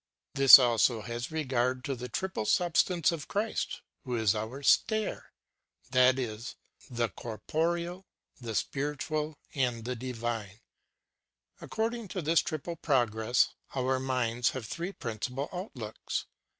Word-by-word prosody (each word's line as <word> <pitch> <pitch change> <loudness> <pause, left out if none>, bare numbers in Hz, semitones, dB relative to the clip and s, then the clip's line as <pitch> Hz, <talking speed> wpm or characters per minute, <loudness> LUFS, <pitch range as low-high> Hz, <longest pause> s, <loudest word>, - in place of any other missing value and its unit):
"' - - -60
This 135 -1 +11
also 120 -2 +3
has 120 +2 -5
regard 130 -4 0
to 140 - -1
the 125 0 -7
triple 185 - -3
sub 175 -4 +2
stance 175 -3 +3
in 165 - -3
Christ, 210 +7 -2 0.2
who 125 -3 -3
is 110 -4 +3
our 110 +6 -5
stair 220 +7 +2
ŌĆö - - -37
that 130 0 +5
is, 115 -2 -4 0.3
the 120 -2 -1
corporeal, 170 - -3 0.3
the 115 -3 -5
spir 145 +5 -1
itual, 155 +2 -3 0.2
and 120 -4 -1
the 125 +1 -2
divine. 115 -4 -4 1.0
According 225 0 -2
to 185 -2 -4
this 160 +2 +4
triple 165 +1 -4
progress, 120 -4 +2 0.3
our 130 0 +1
minds 125 -2 0
have 125 - -6
three 170 - -4
princi 120 - -5
pal 140 +2 -3
outlooks. 130 - -5
130 Hz, 140 wpm, -30 LUFS, 120-160 Hz, 1.0 s, This